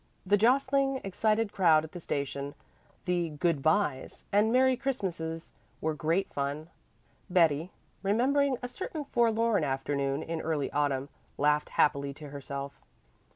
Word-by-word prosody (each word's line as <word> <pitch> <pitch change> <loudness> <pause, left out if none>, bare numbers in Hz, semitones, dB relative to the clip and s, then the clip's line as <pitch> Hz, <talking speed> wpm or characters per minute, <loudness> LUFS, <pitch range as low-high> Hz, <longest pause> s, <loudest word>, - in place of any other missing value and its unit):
The 200 +2 +4
jostling, 270 +4 +2
excited 215 +2 0
crowd 165 -5 +4
at 160 - -9
the 175 - -7
station, 140 -2 -3 0.5
the 175 -2 0
"good 155 -1 0
byes" 155 -4 0
and 210 +2 +3
"Merry 260 +1 +4
Christmases," 180 -11 -3 0.3
were 160 0 -1
great 165 +5 -1
fun. 145 +4 -3 0.6
Betty, 165 -2 +3 0.3
remembering 260 +7 +2
a - - -2
certain 310 +1 -5
forlorn 230 - +2
afternoon 140 +1 -1
in 165 -1 -4
early 155 -3 -1
autumn, 140 -2 0 0.3
laughed 150 +1 +2
happily 140 -2 +1
to 150 -1 -10
herself. 140 0 -7
165 Hz, 130 wpm, -29 LUFS, 145-225 Hz, 0.6 s, The